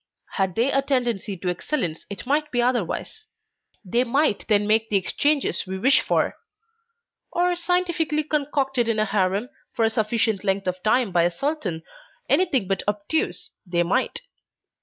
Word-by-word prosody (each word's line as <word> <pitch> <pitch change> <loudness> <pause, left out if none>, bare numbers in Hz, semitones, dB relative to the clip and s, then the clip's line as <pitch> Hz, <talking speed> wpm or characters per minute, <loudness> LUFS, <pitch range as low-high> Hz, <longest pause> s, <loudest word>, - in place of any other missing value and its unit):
Had 190 -3 -1
they 245 +4 +2
a 275 - +3
tendency 240 -8 -1
to 180 +1 -3
excellence 180 - -2
it 200 - -7
might 300 +3 +1
be 245 - -1
otherwise; 245 - -1 0.6
they 235 +7 +2
might 265 -1 +1
then 210 -2 +3
make 220 +1 +2
the 205 - +3
exchanges 285 +5 0
we 190 0 -4
wish 265 +8 +4
for; - - 0 0.9
or 355 0 +1
scientifically 340 -3 0
concocted 275 -5 0
in 225 - +1
a 215 - +2
harem 200 +3 0 0.3
for 225 - +2
a 225 - +2
sufficient 220 -2 0
length 195 0 0
of 185 0 -2
time 220 +1 +2
by 175 -1 +3
a 170 - +3
sultan 185 - -3 0.4
anything 270 - +2
but 195 -1 0
obtuse, 205 +9 -1
they 175 -3 0
might. 245 - 0
230 Hz, 160 wpm, -24 LUFS, 195-280 Hz, 0.9 s, wish